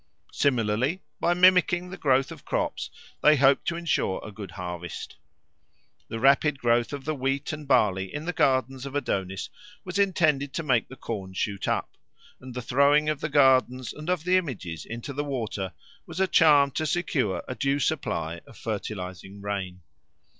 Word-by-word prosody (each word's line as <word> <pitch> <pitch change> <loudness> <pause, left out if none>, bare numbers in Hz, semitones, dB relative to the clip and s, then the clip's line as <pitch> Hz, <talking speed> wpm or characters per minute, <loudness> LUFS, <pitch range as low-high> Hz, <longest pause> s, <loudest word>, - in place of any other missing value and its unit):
Similarly, 125 - +1 0.2
by 175 +1 +2
mimicking 180 0 +4
the - - -5
growth 135 -5 +2
of - - -10
crops - - -2 0.3
they 150 0 +6
hope 135 -1 +4
to 170 - -1
ensure 170 - 0
a 110 - -7
good 100 -2 -8
harvest. 90 0 -6 0.9
The 115 - -5
rapid 140 +3 +4
growth 120 -2 +2
of 140 -2 -6
the 155 - -1
wheat 135 +1 -2
and 150 -2 -7
barley 95 -8 +2
in 150 +2 -5
the 180 - -2
gardens 130 -2 +1
of 140 - -8
Adonis 95 -8 -2 0.3
was 185 +2 -3
intended 155 -8 +2
to 165 - -2
make 125 -7 +2
the 135 - -11
corn 100 -7 -6
shoot 100 0 -2
up; - - -2 0.4
and 130 -1 -10
the 125 - -4
throwing 140 +5 +3
of 150 -2 -2
the 155 - -2
gardens 130 -3 +3
and 155 +3 -7
of 180 -3 0
the 180 +1 +3
images 100 - -4
into 115 +4 -6
the 145 +2 -2
water 115 - -3 0.4
was - - -7
a 190 - +4
charm 150 -6 +5
to 155 +4 -2
secure 140 - 0
a - - -3
due 140 +2 0
supply 85 - -2
of - - -15
fertilising 100 -3 -5
rain. 100 -3 -4
135 Hz, 175 wpm, -26 LUFS, 105-150 Hz, 0.9 s, they